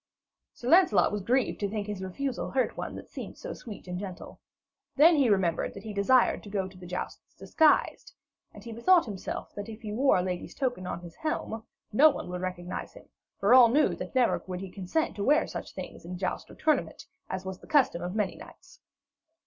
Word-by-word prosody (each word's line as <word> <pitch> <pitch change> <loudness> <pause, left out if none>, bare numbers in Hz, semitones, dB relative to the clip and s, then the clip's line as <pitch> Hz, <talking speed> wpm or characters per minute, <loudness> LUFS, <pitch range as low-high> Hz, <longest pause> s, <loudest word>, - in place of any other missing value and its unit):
Sir 240 - -8
Lancelot 310 - +5
was 210 -1 -2
grieved 245 +6 +1
to 200 - -1
think 210 0 -3
his 205 -2 -5
refusal 245 +8 -3
hurt 260 -1 0
one - - -5
that - - -9
seemed - - -8
so - - -6
sweet 210 -5 -10
and 180 0 -4
gentle. 185 -2 -8 0.6
Then 320 +4 +7
he 275 -5 +3
remembered 185 -5 +1
that 200 - -9
he 215 - -6
desired 240 +6 +3
to 205 - -11
go 195 -2 -1
to 190 - -14
the 180 -1 -11
jousts 180 +1 -6
disguised, 315 -2 +2 0.4
and 205 - -13
he 230 - -8
bethought 330 +8 +4
him 205 - -4
that 205 +3 -6
if 225 +1 -10
he 210 - -5
wore 265 +2 +4
a 180 - +1
lady's 180 -1 -4
token 245 -9 -2
in 180 - -4
his 170 -2 -12
helm, 270 -8 -3 0.3
no 295 +8 +7
one 280 - -5
would 180 0 -4
recognise 180 -1 -5
him, - - -15 0.3
for 200 +5 +4
all 250 -2 +9
knew 295 +5 +4
that - - -7
never 250 -2 +3
would 180 -1 -4
he 190 -2 -7
consent 195 - -2
to 200 - -2
wear 300 +7 +4
such - - -7
things - - -8
in 180 +2 -6
joust 185 0 -3
or - - -12
tournament, 310 -1 0 0.2
as 190 0 -4
was 190 -1 -6
the - - -16
custom 270 - +3
of 180 +3 -4
many 210 -4 0
knights. - - -15
210 Hz, 215 wpm, -28 LUFS, 185-260 Hz, 0.6 s, all